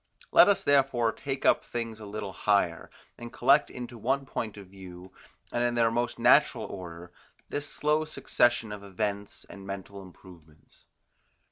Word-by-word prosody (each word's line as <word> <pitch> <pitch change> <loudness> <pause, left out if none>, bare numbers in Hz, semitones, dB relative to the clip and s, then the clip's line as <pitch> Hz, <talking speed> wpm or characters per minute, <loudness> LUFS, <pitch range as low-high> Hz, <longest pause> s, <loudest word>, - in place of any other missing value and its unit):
Let - - +8
us 200 - +2
therefore 135 -5 +3
take 135 +2 -5
up - - +4
things 115 -2 -5
a 105 - -9
little 100 -1 -6
higher, 100 -5 0 0.3
and 120 0 -8
collect 140 +4 +3
into 120 -1 -8
one 135 +5 0
point 110 -5 -5
of 100 - -10
view, 95 -1 -12 0.4
and 120 - 0
in 120 0 0
their 115 -1 +3
most 120 +1 -1
natural - - +4
order, 90 -2 -9 0.4
this 145 0 -4
slow 150 +1 +1
succession 120 -7 +1
of 105 -1 -7
events 100 +1 -4
and 100 - -11
mental 100 0 -7
improvements. 85 -5 -17
110 Hz, 155 wpm, -28 LUFS, 95-120 Hz, 0.4 s, Let